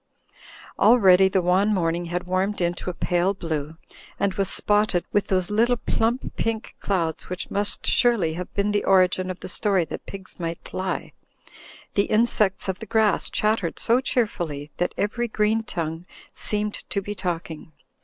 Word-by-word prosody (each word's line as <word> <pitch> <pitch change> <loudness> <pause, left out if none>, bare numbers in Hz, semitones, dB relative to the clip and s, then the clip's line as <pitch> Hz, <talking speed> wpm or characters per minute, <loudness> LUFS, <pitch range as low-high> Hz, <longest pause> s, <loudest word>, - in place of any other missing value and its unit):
Already 195 -5 +6
the 190 -1 +1
wan 190 +4 +3
morning 170 -1 0
had 175 +1 -3
warmed 185 +3 -1
into 175 +1 -1
a - - -3
pale 180 +3 +1
blue 160 -3 -4 0.4
and 200 -1 +1
was 195 -1 0
spotted 205 -4 +1
with 205 - +2
those 185 0 0
little 235 +3 +3
plump 230 +2 -1
pink 225 -1 -2
clouds 170 -5 -2
which 180 0 -5
must 205 0 -2
surely 230 -10 +3
have 180 +2 -6
been 200 +1 +1
the 205 0 +1
origin 185 -1 +3
of 185 0 -6
the - - -6
story 190 -2 +2
that - - -8
pigs 190 -2 -9
might 165 -1 -3
fly. 185 0 -4 0.8
The 200 - +2
insects 215 -4 +1
of 190 -1 -2
the 220 - -8
grass 220 -1 +2
chattered 210 -5 0
so 235 +2 +3
cheerfully 170 - -2
that 175 - -1
every 235 +4 -1
green 215 0 +1
tongue 165 -4 -4 0.3
seemed 210 0 -2 0.2
to 200 - 0
be 205 +1 -5
talking. 170 -5 -5
190 Hz, 165 wpm, -24 LUFS, 175-210 Hz, 0.8 s, Already